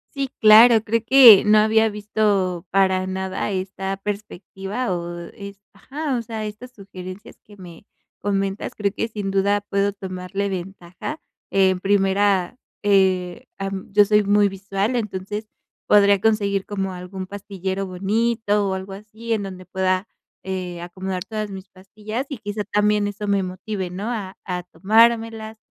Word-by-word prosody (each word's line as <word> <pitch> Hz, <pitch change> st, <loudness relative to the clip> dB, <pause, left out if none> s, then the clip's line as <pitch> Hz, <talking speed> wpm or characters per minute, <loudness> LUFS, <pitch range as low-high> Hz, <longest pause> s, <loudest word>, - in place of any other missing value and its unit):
Sí, 275 Hz, -1 st, -1 dB
claro, 220 Hz, +1 st, +8 dB
creo 230 Hz, +1 st, 0 dB
que 245 Hz, -8 st, +9 dB
no 215 Hz, 0 st, +6 dB
había 220 Hz, +1 st, +4 dB
visto 205 Hz, -4 st, -1 dB
para 190 Hz, -1 st, +2 dB
nada 190 Hz, +1 st, -3 dB
esta 190 Hz, +1 st, -3 dB
perspectiva, 200 Hz, +2 st, -5 dB
o 175 Hz, -1 st, -4 dB, 0.2 s
es 200 Hz, -2 st, -10 dB
ajá, 275 Hz, +7 st, -4 dB
o -, -, -3 dB
sea, 220 Hz, -1 st, -5 dB
estas 230 Hz, +4 st, -9 dB
sugerencias 190 Hz, -1 st, -10 dB
que 205 Hz, -1 st, -16 dB
me 180 Hz, 0 st, -13 dB, 0.3 s
comentas, 195 Hz, 0 st, -2 dB
creo 205 Hz, -1 st, 0 dB
que 225 Hz, -, -2 dB
sin 205 Hz, -3 st, -4 dB
duda 200 Hz, +1 st, +2 dB
puedo 200 Hz, 0 st, -1 dB
tomarle 190 Hz, 0 st, -4 dB
ventaja. 185 Hz, -, -6 dB, 0.3 s
En 190 Hz, -1 st, +3 dB
primera, 195 Hz, +1 st, +2 dB, 0.3 s
eh, 190 Hz, +1 st, +2 dB
am, 195 Hz, 0 st, -5 dB
yo 205 Hz, +1 st, +6 dB
soy 210 Hz, 0 st, +3 dB
muy 205 Hz, 0 st, +4 dB
visual, 195 Hz, +4 st, -2 dB
entonces, 210 Hz, 0 st, -4 dB, 0.4 s
podría 200 Hz, -1 st, +5 dB
conseguir 200 Hz, -3 st, +1 dB
como 195 Hz, -2 st, -3 dB
algún 185 Hz, +1 st, -7 dB
pastillero 195 Hz, -1 st, -4 dB
bonito 205 Hz, +2 st, 0 dB
o 190 Hz, -, -1 dB
algo 190 Hz, +1 st, -6 dB
así. 220 Hz, +3 st, -7 dB
En 210 Hz, -3 st, 0 dB
donde 185 Hz, -1 st, -8 dB
pueda, 185 Hz, +2 st, -1 dB, 0.3 s
eh, 185 Hz, -2 st, -5 dB
acomodar 185 Hz, +1 st, -5 dB
todas 215 Hz, -1 st, -4 dB
mis 190 Hz, 0 st, -9 dB
pastillas, 210 Hz, +6 st, -6 dB
y 280 Hz, -, -5 dB
quizá 205 Hz, 0 st, -4 dB
también 210 Hz, 0 st, +1 dB
eso 205 Hz, 0 st, -5 dB
me 200 Hz, -1 st, +2 dB
motive, 185 Hz, +1 st, -5 dB
¿no? 200 Hz, +6 st, -4 dB
A 200 Hz, -5 st, -5 dB
a 180 Hz, -1 st, -4 dB
tomármelas, 225 Hz, +3 st, +2 dB
200 Hz, 150 wpm, -22 LUFS, 190-215 Hz, 0.4 s, que